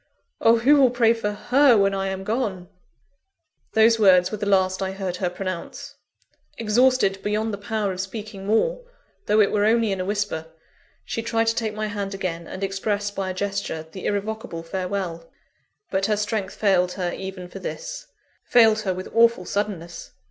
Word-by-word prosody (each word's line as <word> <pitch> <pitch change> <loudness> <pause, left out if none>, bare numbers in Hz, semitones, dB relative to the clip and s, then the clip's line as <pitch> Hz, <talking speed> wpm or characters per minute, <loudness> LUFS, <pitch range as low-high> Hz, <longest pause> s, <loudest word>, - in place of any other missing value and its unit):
_ - - -43 0.4
oh! 230 +1 +5
who 275 +6 +5
will 265 -3 +6
pray 235 -2 +3
for 225 -3 -2
her 250 +4 +4
when 195 -1 +3
I 195 0 -1
am 190 0 -4
gone?" 200 -5 -2 1.0
Those 225 +1 +5
words 185 -4 +5
were 215 - -4
the 205 - -2
last 185 -1 +2
I 190 0 -2
heard 190 -2 -4
her 180 -1 -1
pronounce. 185 -1 -6 0.6
Exhausted 225 -3 +2
beyond 215 +2 -1
the 200 - -4
power 210 -1 -2
of 185 0 -3
speaking 200 0 -7
more, - - +1 0.4
though 210 - +3
it 205 - +4
were 205 - +1
only 225 0 +3
in 195 - -2
a - - -3
whisper, 205 -5 -2 0.6
she 230 - -3
tried 225 0 0
to 225 - 0
take 220 -2 -2
my 215 0 -2
hand 205 -2 -4
again, 170 -3 -4
and 190 - -6
express 205 +1 -1
by 195 -2 -3
a - - -3
gesture 195 -5 -3
the 190 - -5
irrevocable 205 -4 -3
farewell. 180 -1 -4 0.6
But 190 0 +1
her 210 -1 +1
strength 210 -2 -2
failed 180 -3 +2
her 180 -2 -3
even 190 -1 -7
for 195 - -9
this - - -6 0.4
failed 225 -3 +5
her 190 -4 -1
with 185 - -6
awful 230 -4 +4
suddenness. 175 -5 -4
200 Hz, 185 wpm, -23 LUFS, 190-220 Hz, 1.0 s, will